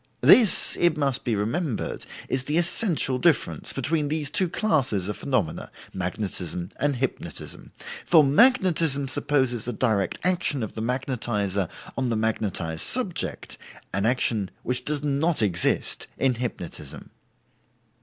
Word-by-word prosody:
This, 225 -6 +6
it 175 -3 +3
must 140 -4 +1
be 115 - -1
remembered, 115 - -2 0.2
is 130 0 -2
the 150 +3 -1
essential 170 - +1
difference 170 -1 +1
between 150 +3 -1
these 150 -1 -2
two 185 +1 +2
classes 135 - 0
of 105 - -3
phenomena 115 - -2 0.2
(magnetism 90 -2 -3
and 145 0 0
hypnotism): 130 +1 -5 0.3
for 160 -3 +5
magnetism 165 - +3
supposes 130 -4 0
a 125 - -2
direct 105 -5 0
action 175 -8 +1
of 110 - -6
the 110 - -6
magnetizer 115 - -2 0.3
on 130 -2 -1
the 115 - 0
magnetized 100 -7 -2
subject, 230 -9 -1 0.3
an 100 +2 0
action 115 -5 +1
which 125 0 -1
does 150 -1 -1
not 145 0 +1
exist 90 -4 0
in 135 -1 +1
hypnotism." 100 - -7
130 Hz, 130 wpm, -24 LUFS, 105-155 Hz, 0.3 s, This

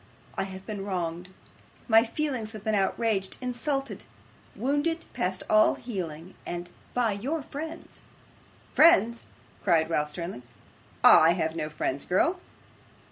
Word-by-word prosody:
I - - -2
have 190 0 -9
been 205 -3 -5
wronged; 180 -2 -3 0.6
my 225 -1 +6
feelings 245 -4 -3
have 215 -2 -8
been 220 -1 0
outraged, 200 0 0
insulted, 270 +2 -3 0.5
wounded 290 +5 0
past 185 +1 -2
all 215 0 +5
healing, 180 -6 -6
and 175 0 -6 0.2
by 240 -3 +2
your 275 +10 -3
friends.' 320 +5 -8 0.7
'Friends!' 235 - +5 0.4
cried 160 -1 +3
Ralph, 150 -2 +1
sternly. 170 -3 -6 0.6
'I 165 +2 +8
have 160 -2 -1
no 155 -2 -3
friends, 140 -2 -3
girl. 330 - +2
205 Hz, 125 wpm, -27 LUFS, 175-250 Hz, 0.7 s, I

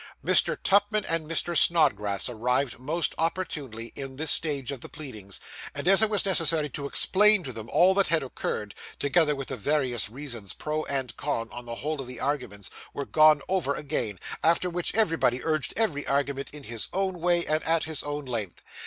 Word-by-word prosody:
Mr. - - +4
Tupman 205 +1 +3
and 165 -2 0
Mr. 170 +1 0
Snodgrass 105 - +4
arrived, 125 +2 -1
most 155 +5 -1
opportunely, 150 -9 -3
in 135 -1 -7
this 155 +2 -1
stage 145 -5 0
of 135 -4 -7
the - - -9
pleadings, 110 -10 -7 0.4
and - - -3
as 195 +2 +6
it 220 - +5
was 210 -2 0
necessary 165 -5 +1
to 140 +2 -5
explain 210 +6 +5
to 130 -4 -5
them 110 0 -8
all 185 +2 +4
that 195 0 +3
had 165 -3 +2
occurred, 105 -5 -4 0.2
together 150 +1 +2
with 135 -1 -6
the - - -2
various 125 -2 +1
reasons 120 -6 -4
pro 155 0 -3
and 135 -4 -2
con, 115 -6 -3 0.2
the 115 - -4
whole 150 +3 -4
of 130 - -8
the 125 -2 -8
arguments 125 -9 -3 0.2
were 140 - -4
gone 155 -1 +4
over 175 -7 0
again, 135 -9 -3 0.2
after 170 +2 +2
which 175 +1 -2
everybody 165 - +1
urged 155 -3 -1
every 165 -11 0
argument 140 0 -1
in 150 -1 -8
his 115 -3 -3
own 190 -2 -2
way, 175 0 +3
and 155 +1 0
at 165 0 +2
his 160 -1 -1
own 145 0 -5
length. 110 -8 -4
145 Hz, 190 wpm, -26 LUFS, 125-165 Hz, 0.4 s, as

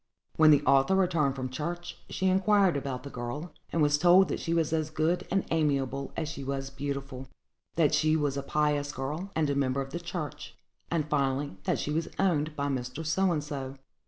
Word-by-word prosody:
When 155 -1 +6
the 150 -1 +6
author 140 +7 +4
returned 170 -8 +2
from 130 -1 -4
church, 175 +5 -4
she 190 - -2
inquired 190 -1 +4
about 135 -2 -3
the 140 - -8
girl, 130 +7 -5 0.2
and 165 - +2
was 145 0 +3
told 180 +3 +6
that - - -2
she 165 - -3
was 165 -2 +1
as 155 -1 0
good 155 +3 0
and 195 +1 +1
amiable 140 -4 0
as 160 - -1
she 150 -3 -6
was 135 0 -3
beautiful; 135 -1 -5 0.5
that 160 -4 +3
she 155 0 +3
was 145 -3 0
a 140 - -2
pious 145 0 0
girl, 150 +8 -4
and 160 -1 +2
a - - 0
member 135 -1 +1
of 135 0 -4
the 170 - -3
church; 170 -4 -6 0.3
and, 160 -3 0
finally, 140 -3 0
that - - +1
she 150 - -3
was 160 +2 -1
owned 155 -5 +1
by 140 -1 -2
Mr. 130 +2 -3
So 185 +4 +2
and 155 -3 -1
so. 135 -3 -5
150 Hz, 205 wpm, -29 LUFS, 140-165 Hz, 0.5 s, When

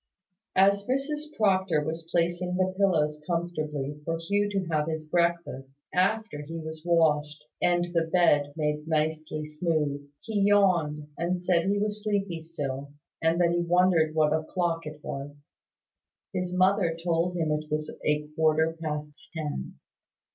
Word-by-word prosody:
As 200 +1 +4
Mrs 295 +4 -2
Proctor 190 -7 +2
was 160 +2 -5
placing 175 +1 0
the 185 0 +1
pillows 155 -6 +2
comfortably, 155 -4 -2
for 165 +2 -1
Hugh 200 +5 0
to 195 -2 -1
have 155 -2 0
his 160 -1 -3
breakfast, 170 -5 -1 0.2
after 195 -2 +1
he 165 +3 -7
was 160 -1 -6
washed, 150 -3 +2 0.2
and 175 0 +2
the 165 -1 +2
bed 150 -5 +4
made 150 -1 -1
nicely 155 -1 -1
smooth, 150 -2 -1
he 215 -3 -1
yawned, 180 -7 +3
and 175 +2 0
said 175 0 +1
he 200 +1 +2
was 210 +1 -1
sleepy 200 -5 -1
still, 140 -4 -5 0.3
and 165 +1 +2
that 170 -1 +4
he 175 0 +1
wondered 170 -2 +3
what 155 -1 +3
o'clock 165 +1 -1
it 150 0 -8
was. 140 +1 -6 1.0
His 180 -1 -2
mother 185 -2 +2
told 170 +1 0
him 160 -2 0
it 150 0 -2
was 150 0 -2
a 150 0 +1
quarter 160 0 +2
past 150 -2 -5
ten. 150 - -4
165 Hz, 145 wpm, -27 LUFS, 150-180 Hz, 1.0 s, As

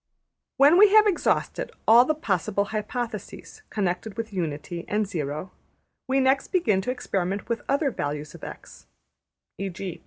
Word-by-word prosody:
When 290 +6 +6
we 415 -1 +8
have 430 0 +8
exhausted 400 -4 0 0.2
all 235 +3 +8
the 310 - +1
possible 200 - -1
hypotheses 235 - -5
connected 195 +1 -2
with 225 -2 -5
Unity 170 -1 -4
and 210 0 0
Zero, 155 -1 -4 0.6
we 265 +1 +2
next 265 +1 +2
begin 220 - +1
to 250 - -2
experiment 195 -5 -3
with 235 -1 -2
other 280 0 +2
values 150 -4 -4
of - - -13
$x$; - - -10 0.7
\emph{e.g. 195 -2 -5
210 Hz, 145 wpm, -25 LUFS, 180-265 Hz, 0.7 s, we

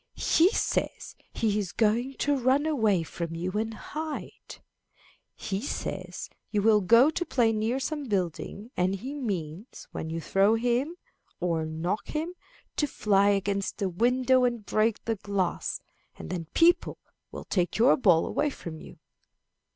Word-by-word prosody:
"He 335 +3 +4
says - - -2 0.2
he 210 -2 0
is 190 -4 -3
going 235 +4 +1
to 290 +2 +1
run 265 +3 +2
away 220 - +2
from 165 0 -5
you 175 +3 -3
and 220 +3 -1
hide. 310 +4 -6 0.8
He 195 0 -3
says 280 - -5 0.2
you 205 -2 0
will 215 -1 +5
go 235 - +6
to 350 - -2
play 240 -9 +2
near 220 +4 0
some 295 +1 -3
building, 200 - -3
and 185 +2 +1
he 255 +9 -6
means, 195 - -5
when 160 - -5
you 165 +1 -3
throw 195 +6 +3
him 245 +7 0 0.4
or 165 -3 0
knock 165 +6 -3
him, 320 +3 -3 0.4
to 295 - +2
fly 200 -5 +2
against 200 0 0
the 195 -2 -1
windows 250 +6 +3
and 235 -4 -4
break 215 +1 +1
the 225 -1 -1
glass, 195 -2 -2 0.4
and - - -8
then 175 -3 -3
people 345 +2 +4 0.3
will - - -8
take 180 -3 0
your 240 +5 +6
ball 180 -10 +4
away 300 - 0
from 165 - -8
you." - - -12
215 Hz, 155 wpm, -28 LUFS, 185-260 Hz, 0.8 s, go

